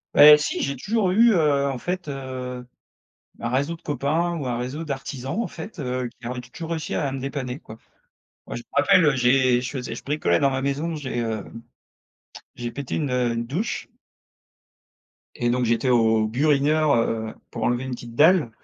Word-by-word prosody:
Eh 150 0 +10
si, 150 - -2
j'ai 140 0 -1
toujours 200 - 0
eu, 230 +4 +6
heu, 145 -5 +2
en 135 -2 -2
fait, 180 +3 -4
heu, 130 -2 -6 0.7
un 120 - -2
réseau 140 +6 0
de - - -28
copains, 155 +5 -1
ou 140 -5 -4
un 120 -1 -1
réseau 135 +7 -4
d'artisans, 135 - -4
en - - -2
fait, 210 - -9
heu, 125 -3 -2
qui 120 - -9
a 125 - -3
tou 125 - -5
toujours 165 0 -7
réussi 165 -1 -3
à 140 -3 0
me 135 - -3
dépanner, 135 -1 -4
quoi. 110 - -12 0.7
Ouais, - - -6
je 120 - -6
me - - -37
rappelle, 165 +5 +5
heu, 150 -2 +4
j'ai 125 0 +3
je 125 -1 -4
faisais 125 -4 -5
je - - -8
bricolais 140 - +1
dans 140 - +3
ma 130 0 -2
maison, 145 +4 -1
j'ai, 130 -4 -4
hem, 115 -1 -4 1.0
j'ai 120 -1 -5
pété 140 -2 -4
une, 145 -5 -1
heu, 125 -2 +1
une 115 0 -3
douche. 175 - -3 1.5
Et 120 0 0
donc 125 +1 +1
j'étais 115 +3 +1
au 110 -3 +3
burineur, 145 +4 +2
heu, 110 -1 -1 0.2
pour 115 - -4
enlever 120 +2 +1
une 130 - -5
petite 120 -1 -7
dalle 160 -2 +5
135 Hz, 195 wpm, -24 LUFS, 120-150 Hz, 1.5 s, Eh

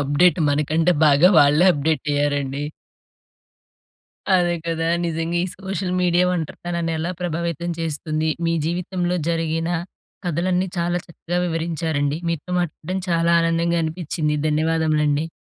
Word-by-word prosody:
Update 145 +5 +3
మనకంటే 155 +4 +2
బాగా 150 +4 +6
వాళ్ళే 150 +5 +5
అప్డేట్ 150 0 -1
అయ్యారండి. 145 -1 -1 1.7
అదే 175 -2 +3
కదా! 165 -1 -1 0.2
నిజంగా 165 +1 -2
ఈ - - -2
సోషల్ 190 -1 -4
మీడియా 180 0 +3
ఒంటరితనాన్ని 170 0 -3
ఎలా 170 +3 -2
ప్రభావితం 170 0 -2
చేస్తుంది. 155 0 -2 0.2
మీ 165 - +1
జీవితంలో 180 +1 -1
జరిగిన 165 0 -1 0.6
కథలన్నీ, 180 +2 0
చాలా 175 +1 0
చక్కగా 175 +1 -4
వివరించారండి. 160 -3 -1
మీతో 165 +1 -4
మాట్లాడడం 175 +2 -3
చాలా 170 0 +2
ఆనందంగా 165 0 +1
అనిపించింది. 155 -2 -2
ధన్యవాదములండి. 155 -1 +1
165 Hz, 115 wpm, -22 LUFS, 155-175 Hz, 1.7 s, బాగా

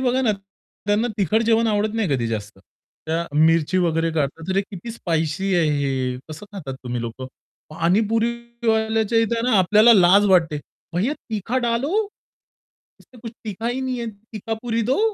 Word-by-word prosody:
बघा 255 0 +1
ना, 220 -4 +3 0.5
त्यांना 210 +4 +2
तिखट 210 +4 +2
जेवण 230 0 +3
आवडत 215 0 0
नाही 220 -6 0
कधी 120 -3 -1
जास्त. 105 -2 -5 0.5
त्या 165 +2 -1
मिरची 165 +3 +3
वगैरे 165 -1 +1
काढतात, 160 +3 -2
"अरे, 195 +1 +2
किती 200 +2 -8
स्पाइसी 170 -1 -1
आहे 165 -3 +3
हे 130 -2 -1
कसं 160 +7 -9
खातात 145 -10 -6
तुम्ही 120 -1 -3
लोकं?" 120 +3 -6 0.4
पाणीपुरीवाल्याच्या 225 +4 0
इथं 230 +1 0
ना 220 - +4
आपल्याला 215 +5 +6
लाज 190 +2 +6
वाटते. 165 -5 +3 0.4
"भैय्या 225 +12 0
तीखा 225 0 -3
डालो. 240 +5 0 1.1
इस - - -21
में 245 - -14
कुछ 230 -1 -7
तीखा 220 +2 -4
ही 250 +2 -2
नहीं 260 -1 -2
है, 235 - -3 0.3
तीखापुरी 225 +2 -3
दो." - - +2
205 Hz, 160 wpm, -22 LUFS, 165-230 Hz, 1.1 s, आपल्याला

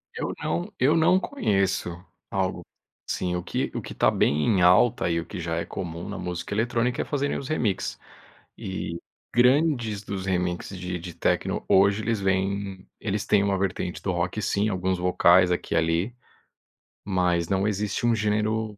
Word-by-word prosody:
Eu - - -2 0.2
não 85 +2 -2
eu 140 +5 +4
não 180 +4 +5
conheço 100 - 0 0.4
algo - - -1 0.5
assim. 90 -1 -1
O 90 - -3
que - - -2
o - - -2
que - - -8
tá - - +3
bem 75 +1 +2
em 100 -6 +3
alta 90 +3 +4
e 85 - +1
o 85 - -5
que 100 - -7
já 85 -1 -2
é 85 - -2
comum 85 0 -6
na 105 - -5
música 90 +2 -4
eletrônica 120 +2 0
é - - -3
fazerem 145 -1 -1
os 135 - -6
remix. 115 -11 -1 0.6
E 90 -3 -5 0.4
grande 120 -5 +3
dos 95 -1 -4
remix 90 -2 -1
de 90 -2 -4
de 85 0 -8
techno - - 0
hoje, 100 +2 +4
eles 115 -2 -1
vêm 95 0 -1
eles 105 -1 -2
têm 100 -1 +4
uma 100 -1 +1
vertente 95 -2 -2
do 95 - -1
rock, 90 +4 -1
sim, 105 +2 +1
alguns 95 -1 -1
vocais 90 0 +4
aqui 90 - -1
e - - +3
ali. 85 +9 +1 0.9
Mas 90 -3 +1
não 95 +1 +1
existe 105 +2 -1
um 120 - +4
gênero 105 0 0
95 Hz, 175 wpm, -25 LUFS, 90-110 Hz, 0.9 s, não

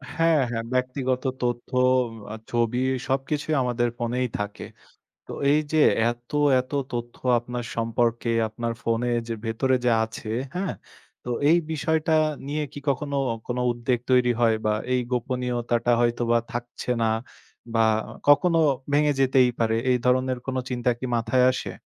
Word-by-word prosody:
হ্যাঁ, 165 -2 +3
হ্যাঁ 115 -1 -2
ব্যক্তিগত 130 0 -1 0.2
তথ্য; 120 -1 -2 0.6
অ্যা 110 - -6 0.2
ছবি, 120 0 +1 0.3
সবকিছুই 145 +3 -1
আমাদের 120 -1 0
ফোনেই 125 +2 -1
থাকে। 105 0 -5 0.6
তো - - -8 0.2
এই 150 +1 +4
যে 155 - +2 0.3
এত, 120 0 -10 0.3
এত 130 +2 -10 0.2
তথ্য 120 0 -4 0.2
আপনার 120 0 -5
সম্পর্কে, 115 0 0 0.2
আপনার 115 +2 -3
ফোনে 115 +1 0 0.2
যে, 115 - -2
ভেতরে 130 +4 +1
যা 120 - +4
আছে, 110 0 -9 0.3
হ্যাঁ? 185 +2 -2 0.5
তো 125 - -5 0.2
এই 170 - +6
বিষয়টা 160 +1 0 0.3
নিয়ে 150 +2 -2
কি - - -8
কখনো, 140 +1 -1 0.3
কোন 120 - -3 0.2
উদ্বেগ 120 +1 -1
তৈরি 125 -1 +4
হয়? 115 -2 +4
বা 105 - +3 0.2
এই 125 - +2
গোপনীয়তাটা 120 -1 0
হয়তোবা 120 0 +2
থাকছে 120 +1 -5
না 110 - +3 0.7
বা 115 - +3 0.5
কখনো 165 +3 +5 0.3
ভেঙে 150 0 +3
যেতেই 130 -1 +4
পারে। 110 -1 +1 0.2
এই 125 - +3
ধরনের 130 0 +2
কোন 130 -1 -2
চিন্তা 125 0 0
কি 130 - -7
মাথায় 125 +2 +2
আসে? - - -4
125 Hz, 145 wpm, -25 LUFS, 120-130 Hz, 0.7 s, এই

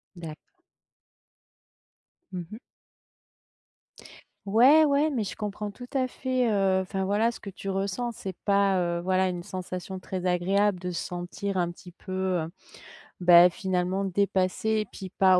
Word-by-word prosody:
D'acc 165 - -10 1.8
Mmh 175 -2 -4
mh. 215 - -7 1.9
Ouais, 260 +10 +6
ouais, 290 +2 +3
mais 245 -7 -1
je 195 - -5
comprends 210 -1 -4
tout 245 +4 -10
à 260 -1 +2
fait, 255 -1 -1
heu 195 -2 +2
enfin, 190 +1 -3
voilà, 210 +4 +2
ce - - -11
que 200 - -8
tu 195 +1 -9
ressens. 195 +5 -1
C'est 195 -5 -7
pas, 200 -1 +3
heu, 170 -1 -1
voilà, 185 +1 +2
une 175 -1 -4
sensation 185 +1 -6
très 185 -1 -4
agréable 190 +2 +2
de 180 0 -4
se 170 - -3
sentir 180 +2 -4
un 175 -1 0
petit 175 +1 -13
peu, 190 +2 -12 0.3
heu, 160 - -6 0.7
bah, 175 0 +8
finalement, 185 0 -1
dépassée 200 +2 +1
et - - -4
puis, 190 -1 -8
pas 185 -1 +6
190 Hz, 150 wpm, -27 LUFS, 180-210 Hz, 1.9 s, bah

